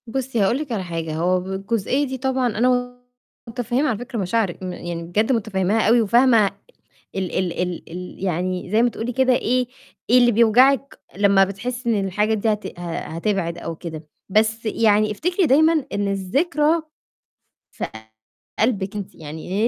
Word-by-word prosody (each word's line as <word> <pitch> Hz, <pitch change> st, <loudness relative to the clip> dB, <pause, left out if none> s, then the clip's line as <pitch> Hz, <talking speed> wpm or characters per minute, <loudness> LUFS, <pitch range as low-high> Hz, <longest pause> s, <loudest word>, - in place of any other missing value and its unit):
بُصّي، 255 Hz, 0 st, -2 dB
هاقول 200 Hz, +6 st, +2 dB
لكِ 295 Hz, -3 st, -5 dB
على 210 Hz, -5 st, -2 dB
حاجة، 165 Hz, -3 st, -4 dB
هو 180 Hz, +3 st, +1 dB
بالجزئية 195 Hz, +8 st, -1 dB
دي 260 Hz, 0 st, -4 dB
طبعًا 260 Hz, -1 st, 0 dB
أنا 245 Hz, +1 st, +1 dB, 0.5 s
متفهّمه 245 Hz, +4 st, -1 dB
على 225 Hz, -, -1 dB
فكرة 245 Hz, 0 st, -5 dB
مشاعرِِك 190 Hz, -1 st, -1 dB
م 180 Hz, -1 st, -4 dB
يعني 170 Hz, -1 st, -5 dB
بجد 210 Hz, +9 st, 0 dB
متفهّماها 210 Hz, -2 st, +1 dB
أوي 235 Hz, +2 st, +5 dB
وفاهمة 230 Hz, 0 st, +4 dB, 0.7 s
ال 190 Hz, -2 st, -2 dB
ال 185 Hz, -2 st, -1 dB
ال 180 Hz, -1 st, -4 dB
ال 180 Hz, +2 st, -8 dB
يعني 180 Hz, 0 st, -2 dB
زي 220 Hz, +2 st, +4 dB
ما 245 Hz, -, +3 dB
تقولي 235 Hz, +1 st, -4 dB
كده 260 Hz, +1 st, +3 dB
إيه، 250 Hz, +1 st, +1 dB, 0.4 s
إيه 245 Hz, -, +6 dB
اللي 240 Hz, -1 st, +5 dB
بيوجعِك 250 Hz, +5 st, +4 dB, 0.2 s
لمّا 200 Hz, -1 st, +5 dB
بتحسي 235 Hz, +5 st, -3 dB
إن 195 Hz, -, -1 dB
الحاجات 210 Hz, +4 st, +1 dB
دي 215 Hz, +1 st, +1 dB
هت 210 Hz, -4 st, -7 dB
ه 170 Hz, -1 st, -4 dB
هتبعد 170 Hz, 0 st, -2 dB
أو 165 Hz, -1 st, -5 dB
كده، 160 Hz, -2 st, -8 dB, 0.2 s
بس 220 Hz, +3 st, +1 dB
يعني 215 Hz, -1 st, +3 dB
افتكري 355 Hz, -, 0 dB
دايمًا 315 Hz, +1 st, +4 dB
إن 205 Hz, 0 st, 0 dB
الذكرى 295 Hz, -, +1 dB, 0.9 s
في -, -, -4 dB, 0.7 s
قلبِك 210 Hz, -3 st, 0 dB
أنتِ، 205 Hz, -2 st, -6 dB
يعني 160 Hz, +8 st, -2 dB
215 Hz, 160 wpm, -22 LUFS, 185-245 Hz, 0.9 s, إيه